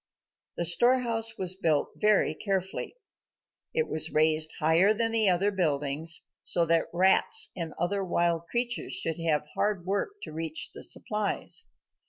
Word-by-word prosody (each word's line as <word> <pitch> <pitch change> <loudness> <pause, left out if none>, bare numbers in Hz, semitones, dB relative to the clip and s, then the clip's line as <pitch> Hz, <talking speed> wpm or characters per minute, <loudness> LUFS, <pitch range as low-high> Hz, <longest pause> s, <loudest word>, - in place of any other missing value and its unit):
The 170 - +1
storehouse 230 +3 +3
was 185 -2 0
built 160 -6 0
very 210 -7 +2
carefully. 190 - -3 0.8
It 470 0 0
was 160 0 +1
raised 155 0 +2
higher 165 +7 +3
than 225 +1 0
the 220 -3 +4
other 190 +3 +2
buildings 155 -3 0 0.2
so 170 - 0
that 165 0 +2
rats 190 - +3
and 165 -4 -5
other 195 +4 -1
wild 170 -2 0
creatures 240 +3 -3
should 165 +1 -4
have 155 -3 0
hard 205 -4 -1
work 205 - -2
to - - -7
reach 160 0 -5
the - - -10
supplies. 210 - -3
180 Hz, 145 wpm, -28 LUFS, 160-215 Hz, 0.8 s, the